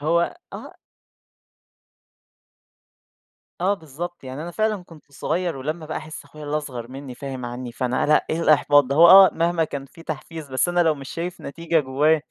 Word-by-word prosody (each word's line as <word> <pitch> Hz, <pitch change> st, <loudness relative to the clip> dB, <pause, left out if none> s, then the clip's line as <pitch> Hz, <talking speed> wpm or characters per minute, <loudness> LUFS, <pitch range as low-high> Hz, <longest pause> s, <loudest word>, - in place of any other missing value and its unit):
هو 170 Hz, -, +1 dB, 0.2 s
آه -, -, -9 dB, 2.9 s
آه 195 Hz, +3 st, +2 dB
بالضبط، 165 Hz, 0 st, -8 dB
يعني 130 Hz, +4 st, -6 dB
أنا 175 Hz, -, -6 dB
فعلًا 215 Hz, 0 st, -1 dB
كنت 155 Hz, -4 st, -17 dB
صغيّر 170 Hz, +2 st, -2 dB
ولمّا 155 Hz, +4 st, -4 dB
بقى 155 Hz, -, -4 dB
احس 155 Hz, -1 st, -9 dB
أخويا 150 Hz, +1 st, -12 dB
اللي 145 Hz, +1 st, -1 dB
اصغر 125 Hz, -6 st, -6 dB
منّي 135 Hz, -1 st, -8 dB
فاهم 130 Hz, -1 st, -6 dB
عنّي، 120 Hz, 0 st, -6 dB
فأنا 125 Hz, +2 st, -1 dB
لأ 150 Hz, -, +3 dB
إيه 160 Hz, -, -1 dB
الإحباط 145 Hz, -2 st, +5 dB
ده 140 Hz, +2 st, -2 dB
هو 170 Hz, +2 st, +8 dB
آه 190 Hz, +1 st, +10 dB
مهما 170 Hz, 0 st, +1 dB
كان 140 Hz, -3 st, -6 dB
في 165 Hz, +5 st, -16 dB
تحفيز 155 Hz, 0 st, -7 dB
بس 130 Hz, +6 st, +1 dB
أنا 175 Hz, 0 st, +1 dB
لو 160 Hz, -2 st, +3 dB
مش 135 Hz, -2 st, -10 dB
شايف 175 Hz, +2 st, -5 dB
نتيجة 165 Hz, +2 st, -1 dB
جوايا، 145 Hz, +3 st, +2 dB
155 Hz, 175 wpm, -23 LUFS, 135-170 Hz, 2.9 s, آه